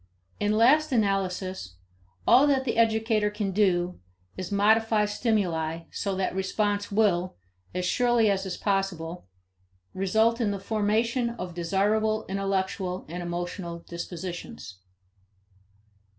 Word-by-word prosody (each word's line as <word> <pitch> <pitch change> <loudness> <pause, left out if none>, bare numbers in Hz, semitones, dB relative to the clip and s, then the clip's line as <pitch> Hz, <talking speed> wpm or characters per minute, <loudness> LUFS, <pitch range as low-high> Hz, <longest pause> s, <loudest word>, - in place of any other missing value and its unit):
In 210 0 +1
last 300 +7 +5
analysis, 190 - -1 0.5
all 275 +4 +6
that 270 -2 +2
the 240 - -1
educator 220 -2 +2
can 210 -1 -3
do 180 -3 +1 0.4
is 185 0 -6
modify 215 +1 +3
stimuli 180 -7 -1
so 195 -2 -2
that 190 -1 -1
response 205 +2 -1
will 195 -4 +2 0.4
as 180 0 -1
surely 240 +3 +3
as 195 -1 +1
is 190 -2 -4
possible 180 - -2 0.7
result 220 +5 +2
in 220 - +2
the 200 -1 -2
formation 220 +4 0
of 180 -7 -6
desirable 210 +5 +1
intellectual 190 -1 -2
and 175 +3 -5
emotional 175 0 -4
dispositions. 170 - -7
195 Hz, 115 wpm, -27 LUFS, 180-220 Hz, 0.7 s, all